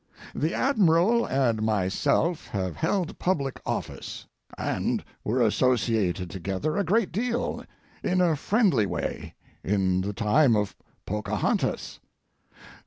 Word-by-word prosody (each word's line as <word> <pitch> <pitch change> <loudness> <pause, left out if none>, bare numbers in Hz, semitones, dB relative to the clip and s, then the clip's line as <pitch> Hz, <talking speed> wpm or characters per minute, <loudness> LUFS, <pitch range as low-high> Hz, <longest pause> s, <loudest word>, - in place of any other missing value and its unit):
The 155 +4 -1
Admiral 220 - +3
and 120 -5 +1
myself 110 - +1
have 95 -3 -3
held 175 +1 -1
public 140 -8 -1
office, - - -4 0.3
and - - -1 0.2
were 120 +3 +1
associated 110 -6 +1
together 95 - -2
a 200 - +1
great 200 +3 +1
deal 240 +5 -2 0.4
in 185 0 +1
a 170 -3 +3
friendly 170 - +2
way - - -4 0.3
in 95 -2 +1
the 100 +2 -3
time 115 +5 +3
of 105 -1 -1 0.3
Pocahontas. 105 +2 -1
130 Hz, 110 wpm, -26 LUFS, -, 0.4 s, Admiral